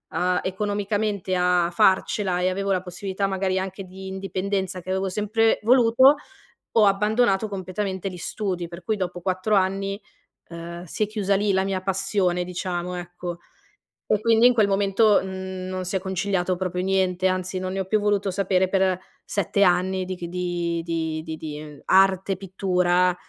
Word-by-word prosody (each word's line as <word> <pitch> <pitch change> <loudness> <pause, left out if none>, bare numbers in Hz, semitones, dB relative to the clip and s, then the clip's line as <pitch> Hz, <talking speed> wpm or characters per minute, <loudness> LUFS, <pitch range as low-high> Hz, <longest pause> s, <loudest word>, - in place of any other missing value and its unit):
a 180 0 +1
economicamente 205 0 -1
a 180 -1 +2
farcela 190 +1 +2
e 180 - +2
avevo 195 +1 -2
la 185 -1 0
possibilità 190 +2 -3
magari 190 -1 0
anche 190 +1 -4
di 190 +1 -11
indipendenza, 190 0 -3
che 185 - -9
avevo 190 0 0
sempre 215 +3 +1
voluto, 250 +4 +6 0.6
ho 225 - +5
abbandonato 210 +1 +2
completamente 190 0 -4
gli 180 - -8
studi. 180 -1 -3
Per 170 +2 -10
cui 215 +5 -1
dopo 180 -2 -4
4 185 +3 0
anni, 195 +1 0 0.5
ehm, 170 +1 -8
si 180 +4 -2
è - - -4
chiusa 205 -2 0
lì 205 0 +1
la 190 0 +2
mia 195 -1 -1
passione 190 -1 0
diciamo, 180 0 -4
ecco. 175 0 -6 0.7
E 215 - +1
quindi 230 +1 +4
in 250 - +7
quel 215 -4 +3
momento, 200 +2 +3
mhmm, 190 -1 -6
non 185 0 -4
si 185 +2 -3
è - - +2
conciliato 190 -1 -1
proprio 180 0 -2
niente, 185 -1 +1
anzi 185 0 -1
non 185 0 -3
ne 195 - -2
ho 190 - -1
più 215 +3 +1
voluto 205 -1 +1
sapere 190 -1 +1
per 190 -1 +2 0.3
7 200 0 +1
anni 185 0 +2
di 185 0 -4
c 175 - -7
di 175 -1 -2
di 160 -2 -2
di 160 -1 -6
di 150 -1 -8
arte, 190 0 +3
pittura, 180 -1 +1
190 Hz, 170 wpm, -24 LUFS, 180-200 Hz, 0.7 s, in